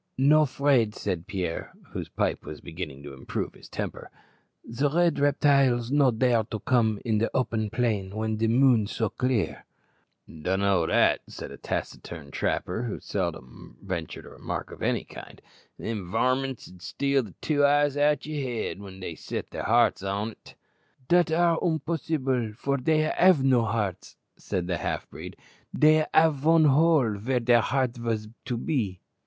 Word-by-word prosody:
"No 150 Hz, +3 st, +5 dB
'fraid," 130 Hz, -5 st, +2 dB
said 90 Hz, -3 st, -3 dB
Pierre, 90 Hz, -5 st, -4 dB, 0.2 s
whose -, -, -6 dB
pipe -, -, -1 dB
was 75 Hz, -, -8 dB
beginning 80 Hz, -5 st, -7 dB
to 70 Hz, -1 st, -9 dB
improve 65 Hz, -, -4 dB
his -, -, -15 dB
temper. -, -, -5 dB, 0.5 s
"The 140 Hz, +5 st, -1 dB
red 170 Hz, +1 st, +2 dB
reptiles 140 Hz, -4 st, +3 dB
no 140 Hz, -2 st, +4 dB
dare 120 Hz, -1 st, +2 dB
to 110 Hz, -1 st, -5 dB
come 110 Hz, -3 st, +1 dB
in 110 Hz, -2 st, +1 dB
open 110 Hz, -4 st, 0 dB
plain 105 Hz, -5 st, -1 dB
when 110 Hz, 0 st, -1 dB
de 115 Hz, +1 st, +1 dB
moon 120 Hz, -2 st, +4 dB
so 110 Hz, 0 st, -1 dB
clear." 125 Hz, -4 st, -1 dB, 0.6 s
"Dun 90 Hz, +5 st, -2 dB
know 95 Hz, -5 st, +2 dB
that," -, -, +3 dB
said -, -, -8 dB
a -, -, -9 dB
taciturn 75 Hz, -5 st, -5 dB
trapper, 90 Hz, -, -1 dB
who 120 Hz, -4 st, -4 dB
seldom 80 Hz, -10 st, -5 dB
ventured 90 Hz, -5 st, -5 dB
a -, -, -11 dB
remark -, -, -6 dB
of -, -, -11 dB
any -, -, 0 dB
kind; -, -, -12 dB, 0.4 s
"them 105 Hz, -6 st, -5 dB
varmints 130 Hz, +4 st, 0 dB
'ud 90 Hz, -1 st, -15 dB
steal 140 Hz, +6 st, 0 dB
the 105 Hz, -7 st, -11 dB
two 145 Hz, -2 st, +1 dB
eyes 145 Hz, 0 st, +3 dB
out 145 Hz, -1 st, +2 dB
o' -, -, -8 dB
you' 150 Hz, -2 st, -2 dB
head 120 Hz, -6 st, -3 dB
when 95 Hz, -1 st, -10 dB
they 85 Hz, -, -5 dB
set -, -, -6 dB
their -, -, -5 dB
hearts 115 Hz, -1 st, +3 dB
on't." 100 Hz, +3 st, -5 dB, 0.5 s
"Dat 175 Hz, -1 st, +4 dB
ar' 170 Hz, 0 st, +3 dB
umposs'ble, 140 Hz, -8 st, -1 dB
for 140 Hz, +4 st, -1 dB
dey 155 Hz, +4 st, +2 dB
have 180 Hz, -7 st, +5 dB
no 125 Hz, -4 st, +3 dB
hearts," 100 Hz, -4 st, -3 dB, 0.2 s
said 90 Hz, -3 st, -3 dB
a 90 Hz, -, 0 dB
half -, -, -3 dB
breed; -, -, -9 dB, 0.4 s
"dey 155 Hz, 0 st, +5 dB
have 160 Hz, -2 st, +4 dB
von 160 Hz, +3 st, +4 dB
hole 145 Hz, -6 st, +4 dB
vere 125 Hz, +4 st, 0 dB
de 120 Hz, 0 st, +4 dB
heart 130 Hz, 0 st, 0 dB
vas 115 Hz, -2 st, -2 dB
be." 115 Hz, -, -3 dB
120 Hz, 165 wpm, -26 LUFS, 100-140 Hz, 0.6 s, No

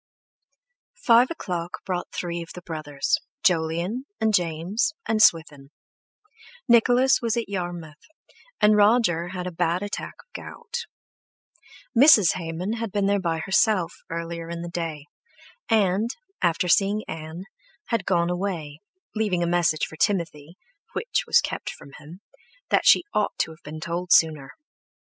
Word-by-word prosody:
Five 240 Hz, +1 st, +5 dB
o'clock 180 Hz, -, -5 dB
brought 180 Hz, -2 st, -3 dB
three 170 Hz, -1 st, -4 dB
of 165 Hz, -, -9 dB
the 180 Hz, -, -9 dB
brothers, 155 Hz, -4 st, -2 dB, 0.2 s
Jolyon 175 Hz, +8 st, 0 dB
and 220 Hz, -1 st, +1 dB
James 180 Hz, -, 0 dB
and 220 Hz, -1 st, +1 dB
Swithin; 150 Hz, -6 st, +3 dB, 1.0 s
Nicholas 245 Hz, +2 st, +4 dB
was 230 Hz, -1 st, 0 dB
at 235 Hz, -, -2 dB
Yarmouth, 175 Hz, -5 st, -5 dB, 0.6 s
and 210 Hz, 0 st, +5 dB
Roger 205 Hz, -5 st, +3 dB
had 180 Hz, 0 st, -5 dB
a 180 Hz, -, -4 dB
bad 175 Hz, +2 st, 0 dB
attack 205 Hz, -, -5 dB
of -, -, -59 dB
gout. 470 Hz, 0 st, -7 dB, 1.1 s
Mrs. 230 Hz, -, +7 dB
Hayman 180 Hz, +5 st, -4 dB
had 225 Hz, -2 st, -4 dB
been 200 Hz, 0 st, +1 dB
by 165 Hz, -3 st, -1 dB
herself 190 Hz, -2 st, +2 dB, 0.2 s
earlier 170 Hz, 0 st, -5 dB
in 170 Hz, 0 st, -5 dB
the 170 Hz, -, -6 dB
day, 165 Hz, -4 st, -4 dB, 0.6 s
and, 210 Hz, 0 st, +2 dB, 0.3 s
after 175 Hz, +1 st, +1 dB
seeing 200 Hz, +4 st, +2 dB
Ann, 160 Hz, +2 st, -7 dB, 0.5 s
had 230 Hz, -4 st, 0 dB
gone 175 Hz, -2 st, +1 dB
away, 175 Hz, -5 st, -4 dB, 0.3 s
leaving 205 Hz, -6 st, 0 dB
a -, -, 0 dB
message 170 Hz, -3 st, +1 dB
for 155 Hz, -, -12 dB
Timothy—which 195 Hz, -, -3 dB
was -, -, +5 dB
kept -, -, -4 dB
from 140 Hz, -, -11 dB
him—that 200 Hz, -, -5 dB
she -, -, +7 dB
ought 210 Hz, -1 st, 0 dB
to -, -, -1 dB
have 160 Hz, -, -15 dB
been 155 Hz, +1 st, -8 dB
told 170 Hz, +3 st, -4 dB
sooner. 155 Hz, -4 st, +4 dB
180 Hz, 135 wpm, -24 LUFS, 165-215 Hz, 1.1 s, Mrs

